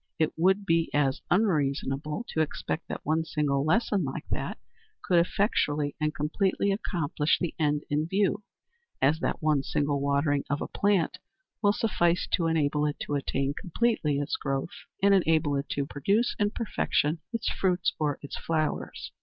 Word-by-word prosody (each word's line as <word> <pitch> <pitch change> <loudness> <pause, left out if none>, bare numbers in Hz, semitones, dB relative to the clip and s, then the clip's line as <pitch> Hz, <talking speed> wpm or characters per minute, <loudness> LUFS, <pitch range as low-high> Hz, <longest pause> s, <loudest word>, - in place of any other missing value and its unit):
It 155 -1 +1
would 190 +4 +2
be 165 -2 +2
as 135 -2 +1
unreasonable 150 - 0
to 160 - 0
expect 155 +1 -3
that - - -6
one 160 +2 +1
single 145 -4 0
lesson 200 +3 +2
like 135 -2 -5
that - - -3 0.5
could 175 -2 +4
effectually 150 -6 +1
and 155 0 +2
completely 190 +7 0
accomplish 165 -6 0
the 175 - -2
end 150 -1 +1
in 150 +2 0
view, 200 +3 +1 0.6
as 150 +4 +3
that - - -2
one 155 -3 +3
single 145 0 0
watering 140 0 +1
of 145 +1 0
a - - -3
plant 200 -4 +1 0.4
will 205 -2 +5
suffice 180 -5 +1
to 165 - +2
enable 150 -2 +1
it 145 - -3
to - - -3
attain 140 -1 -1
completely 170 -4 0
its 145 0 -1
growth, 135 +3 -2 0.3
and 200 0 +6
enable 160 -5 +3
it 140 +1 -3
to 140 - -1
produce 200 - +1
in 205 -1 +3
perfection 170 -8 0
its 230 -1 -1
fruits 180 -2 +1
or 150 -2 0
its 140 - -6
flowers. 155 -2 -2
155 Hz, 160 wpm, -28 LUFS, 145-185 Hz, 0.6 s, and